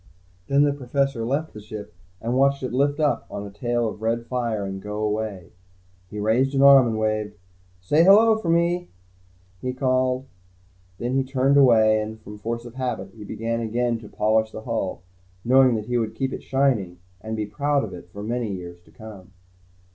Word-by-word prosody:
Then 140 +1 +4
the 145 -1 +2
Professor 135 -2 -1
left 140 +7 -2
the 105 - -9
ship 105 -4 -9 0.3
and 115 +2 -2
watched 140 +1 +2
it 130 - -3
lift 145 +3 +1
up 150 -2 0
on 100 - -6
a 100 - -9
tail 120 +3 -1
of 105 0 -7
red 115 +1 -1
fire 115 -5 -2
and 95 0 -5
go 105 +1 -6
away. 105 -4 -3 0.6
He 105 - -8
raised 125 +6 +1
an 135 - +3
arm 135 -3 +8
and 110 -1 -1
waved. 110 -1 -1 0.5
"Say 150 - +3
'hello' 215 +4 +7
for 175 - -3
me," 170 +1 +1 0.7
he 125 0 -2
called. 130 0 0 0.7
Then 120 +2 -3
he 135 0 +2
turned 135 +1 +1
away 110 -5 +5
and, 110 +1 -6
from 105 -1 -11
force 115 +3 -4
of 120 - -10
habit, 125 -7 -4
he 110 - -10
began 115 +3 -3
again 115 +1 -1
to 105 -2 -12
polish 110 +1 +1
the 110 - -8
hull, 110 -6 -3 0.4
knowing 130 0 +5
that 105 -1 -3
he 120 +1 0
would 110 -1 -3
keep 135 +3 -2
it - - -5
shining, 125 -10 0 0.2
and 110 0 -5
be 105 - -1
proud 140 +7 0
of - - -6
it, 85 0 -11
for 100 +2 -8
many 115 0 -2
years 85 -2 -8
to - - -21
come. 100 -4 -12
115 Hz, 195 wpm, -24 LUFS, 105-135 Hz, 0.7 s, arm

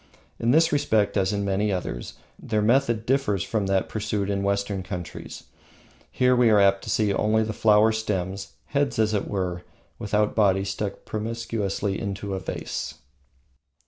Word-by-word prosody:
In 115 - 0
this 160 +5 +4
respect, 110 -8 +1
as 95 -2 +2
in 100 -1 -1
many 100 +2 0
others, 90 -10 -4 0.2
their 105 -1 -1
method 115 -1 +2
differs 120 -8 +1
from 105 -4 -1
that 95 -1 +1
pursued 105 -2 -2
in 100 0 -1
Western 100 0 -1
countries. 90 -3 -7 0.7
Here 125 0 +3
we 120 -2 +4
are 105 -2 +5
apt 100 0 +4
to - - -6
see 105 -2 +2
only 110 +2 +2
the 110 0 -3
flower 105 +1 +4
stems, 95 -3 -3
heads 140 -1 0
as 110 -1 +2
it 100 - -1
were, 90 -3 -2 0.4
without 105 0 +1
body, 95 -3 +3
stuck 100 +1 -4
promiscuously 110 -3 -2
into 100 -1 -4
a 95 - -2
vase. - - -5
105 Hz, 160 wpm, -25 LUFS, 100-110 Hz, 0.7 s, are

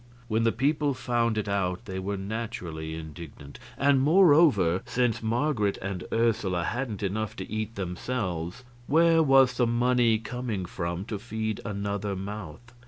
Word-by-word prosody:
When 115 0 +1
the 115 - +4
people 145 +3 +1
found 115 -3 0
it 105 - -1
out 100 +1 -1
they 95 -2 -5
were 100 +2 -3
naturally 95 -7 -5
indignant. 80 -3 -10 0.2
And, 140 -1 +4
moreover, 145 - +5
since 120 -2 0
Marget 115 -2 0
and 95 -2 -5
Ursula 105 -6 +1
hadn't 115 -1 -3
enough 105 +2 -2
to 95 - -6
eat 110 +1 -3
themselves, 90 0 -3 0.2
where 165 +2 +5
was 135 -4 +5
the 120 - +3
money 120 -1 +3
coming 115 -3 -4
from 85 +1 -4
to 105 -2 -4
feed 110 -1 -3
another 100 -1 -3
mouth? 100 +2 -7
110 Hz, 145 wpm, -27 LUFS, 95-125 Hz, 0.2 s, moreover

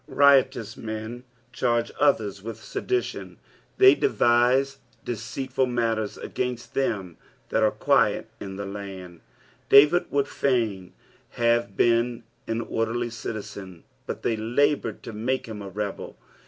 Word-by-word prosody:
Riotous 130 -5 +3
men 110 +3 -6 0.3
charge 120 -1 0
others 105 -9 +2
with 110 +1 -6
sedition. 375 0 -3 0.2
" - - -35
Tliey 390 0 +7
d - - +3
erine 125 - +3 0.3
deceitful 125 +4 -2
matter* 115 -2 0
agaiit^ 125 +3 -5
them 100 -10 -2 0.3
tliat - - +2
are - - +5
qaut - - +2
in 95 -1 -7
the 100 +1 -5
land." 95 -4 -8 0.5
David 150 +6 +7
would 140 -1 +1
f;iin 110 -9 -1 0.4
have 120 0 +1
been 120 0 +2 0.2
an 115 +1 -1
orderly 115 +1 -2
citizen, 100 -5 -7 0.2
but - - -5
they 115 - +1
laboured 120 +1 0
to 115 - -7
make 125 +5 -1
hira 105 -3 -7
a - - -7
rebel. 100 +1 -5
115 Hz, 130 wpm, -25 LUFS, 105-130 Hz, 0.5 s, Tliey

